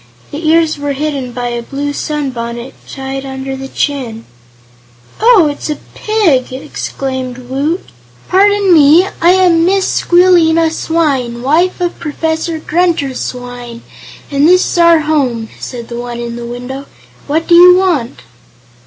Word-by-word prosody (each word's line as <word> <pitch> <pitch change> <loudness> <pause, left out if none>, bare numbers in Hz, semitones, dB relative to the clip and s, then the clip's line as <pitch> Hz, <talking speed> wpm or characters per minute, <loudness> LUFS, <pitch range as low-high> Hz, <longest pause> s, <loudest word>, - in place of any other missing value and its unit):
The 310 +2 -4
ears 320 -2 +2
were 285 0 -2
hidden 275 -3 -3
by 245 0 -4
a 240 0 -3
blue 285 +4 -4
sunbonnet 250 -5 -4 0.2
tied 270 0 -5
under 265 0 -5
the 270 0 -7
chin. 255 -6 -3 1.0
"Oh; 440 -8 +5
it's 290 +1 -5
a 300 - -1 0.2
pig!" 365 - +1
exclaimed 260 -2 -5
Woot. 275 +7 -3 0.4
"Pardon 400 0 +3
me; 320 +4 +6
I 340 - +5
am 355 -3 +3
Mrs. 380 +2 +1
Squealina 335 -2 +4
Swyne, 275 -8 -1
wife 335 +8 +1
of 350 -1 -2
Professor 320 +1 -2
Grunter 320 -4 0
Swyne, 245 -2 -7 0.5
and 285 +2 +3
this 365 +1 +4
is - - -2
our 335 -1 +5
home," 260 -8 -1
said 240 -2 -7
the 235 0 -6
one 240 0 -6
in 235 0 -5
the 235 0 -7
window. 250 +3 -7 0.4
"What 315 +3 0
do 345 - +3
you 360 +1 +8
want?" 340 -11 -1
290 Hz, 145 wpm, -13 LUFS, 255-335 Hz, 1.0 s, you